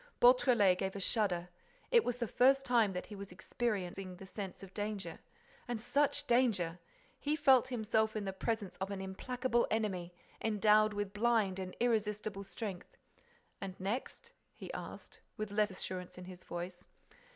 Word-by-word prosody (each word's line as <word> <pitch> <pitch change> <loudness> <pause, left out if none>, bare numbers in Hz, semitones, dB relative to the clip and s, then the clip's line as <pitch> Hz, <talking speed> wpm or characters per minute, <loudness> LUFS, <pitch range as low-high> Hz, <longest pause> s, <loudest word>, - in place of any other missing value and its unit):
Beautrelet 240 -7 +6
gave 190 0 -2
a - - -3
shudder. 185 -3 0 0.4
It 475 -2 +6
was 245 -1 -1
the 240 -2 -1
first 270 +4 +4
time 230 -5 +4
that 180 - -4
he 210 - -9
was 200 -1 -8
experiencing 190 -2 -3
the 190 - -10
sense 195 0 -7
of 190 -1 -11
danger. 205 -5 -4 0.5
And 240 -2 -2
such 290 +4 +1
danger! 220 -10 +2 0.4
He 295 +1 0
felt 270 -5 +5
himself 220 -2 +1
in 210 -2 -2
the 195 - -2
presence 210 -1 -2
of 190 +1 -3
an 200 -1 -4
implacable 240 +6 0
enemy, 185 -6 -1 0.3
endowed 215 0 +4
with 205 -1 -3
blind 210 -3 +2
and 185 -1 -6
irresistible 210 -3 0
strength. 195 -2 -6 0.6
"And 190 -2 -6
next?" 245 - -4 0.2
he - - -8
asked, - - -8 0.2
with 215 -2 -3
less 210 +1 +2
assurance 185 -1 -6
in 180 - -8
his 185 0 -10
voice. 175 +1 -6
210 Hz, 160 wpm, -34 LUFS, 190-235 Hz, 0.6 s, Beautrelet